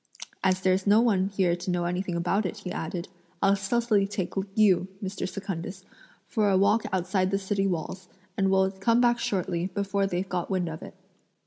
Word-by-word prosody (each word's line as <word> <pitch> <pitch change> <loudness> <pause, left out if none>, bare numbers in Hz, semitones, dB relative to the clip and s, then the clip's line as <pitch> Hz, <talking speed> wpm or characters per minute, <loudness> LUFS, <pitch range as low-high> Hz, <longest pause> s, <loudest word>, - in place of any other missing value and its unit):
"As 185 -1 +2
there's 185 +1 +1
no 205 +2 +6
one 200 -5 +3
here 190 -3 +1
to 175 +1 -6
know 175 -1 0
anything 180 0 -2
about 180 +5 +1
it," 215 - -6
he 195 -3 -6
added, 170 +1 -4 0.3
"I'll 195 0 +4
stealthily 205 0 +1
take 195 -3 -3 0.2
you, 190 -5 +4
Mr. 195 -1 -4
Secundus, 190 -1 -6 0.4
for 215 -5 +1
a 190 - +4
walk 210 +3 +3
outside 185 0 +1
the 195 - +1
city 195 0 0
walls; 180 +1 -4 0.3
and 195 -1 +2
we'll 190 0 +3
come 200 +5 +2
back 240 -1 +3
shortly, 180 -4 -1
before 200 0 -1
they've 185 0 -2
got 180 -2 -3
wind 185 -3 0
of 160 0 -7
it." - - -10
190 Hz, 190 wpm, -27 LUFS, 180-200 Hz, 0.4 s, no